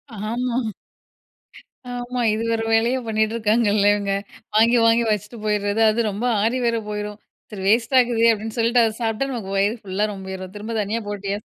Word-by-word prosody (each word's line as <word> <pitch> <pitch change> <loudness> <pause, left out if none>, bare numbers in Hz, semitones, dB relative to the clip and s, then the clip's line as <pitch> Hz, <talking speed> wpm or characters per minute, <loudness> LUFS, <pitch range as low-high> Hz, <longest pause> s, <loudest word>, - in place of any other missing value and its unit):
ஆமா, 235 +4 -2 1.4
ஆமா. 245 0 -4
இது 220 - -2
வேற 225 0 0
வேலையே 235 +4 +2
பண்ணிட்டு 220 0 0
இருக்காங்கல்ல 210 -2 +2
இவங்க, 200 -1 -2 0.4
வாங்கி 235 +2 +5
வாங்கி 230 +1 +4
வச்சுட்டு 210 +2 -3
போயிருது, 210 0 0
அது 225 0 0
ரொம்ப 205 +5 -4 0.2
ஆறி 235 +4 +1
வேற 230 -1 +1
போயிரும் 210 0 -5 0.3
சரி 195 -3 -7
வேஸ்ட் 230 +4 +2
ஆகுதே 235 -2 +3
அப்டின்னு 220 +2 -5
சொல்ட்டு 235 +1 +3
அத 220 - +1
சாப்பிட்டா 225 +5 -1
நமக்கு 195 -5 -5
வயிறு 205 +4 +1
ஃபுல்லா 195 +2 -1
ரொம்பிரும் 190 -1 -7
திரும்ப 215 +3 -6
தனியா 220 +3 -2
போட்டியா 200 0 -3
220 Hz, 160 wpm, -22 LUFS, 205-235 Hz, 1.4 s, வாங்கி